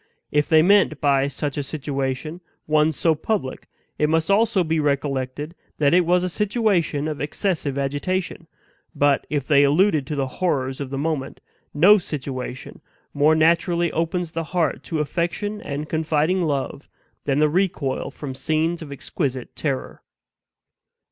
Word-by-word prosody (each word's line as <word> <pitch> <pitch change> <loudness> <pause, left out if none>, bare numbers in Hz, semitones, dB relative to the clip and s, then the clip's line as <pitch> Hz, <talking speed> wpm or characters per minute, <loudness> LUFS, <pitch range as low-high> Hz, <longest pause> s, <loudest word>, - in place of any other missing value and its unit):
If 150 0 +1
they 160 -1 +6
meant 190 -5 +4
by 140 -1 +2
such 145 0 -3
a - - +1
situation, 140 +2 -4 0.2
one 155 0 +3
so 160 +2 +2
public, 155 -3 -3 0.3
it 150 - +2
must 160 +2 +1
be - - +5
also 200 -3 +3
recollected 145 -1 -1 0.2
that 145 0 +3
it 175 -1 +4
was 180 +1 +3
a - - 0
situation 195 - 0
of 155 -2 -4
excessive 150 -2 -1
agitation; 165 +5 -2 0.5
but, 145 -1 +2
if 145 -3 -1
they 140 -1 +5
alluded 155 0 +3
to 150 - -3
the 140 -1 0 0.2
horrors 135 -6 0
of 140 - -4
the 135 - -4
moment, 145 -2 -3 0.3
no 195 +8 +6
situation 130 -5 -6 0.3
more 150 +2 +4
naturally 170 +1 +2
opens 165 +1 -1
the 165 0 -3
heart 165 -5 -1
to 160 - -3
affection 175 +7 -2
and 145 +1 -5
confiding 160 +3 +1
love 140 -1 -3 0.4
than 140 -1 +1
the 150 +1 +4
recoil 155 -5 -1
from 140 -3 -7
scenes 160 +5 -1
of 150 -3 -8
exquisite 135 -2 -4
terror. 140 -4 -3
155 Hz, 150 wpm, -22 LUFS, 140-170 Hz, 0.5 s, they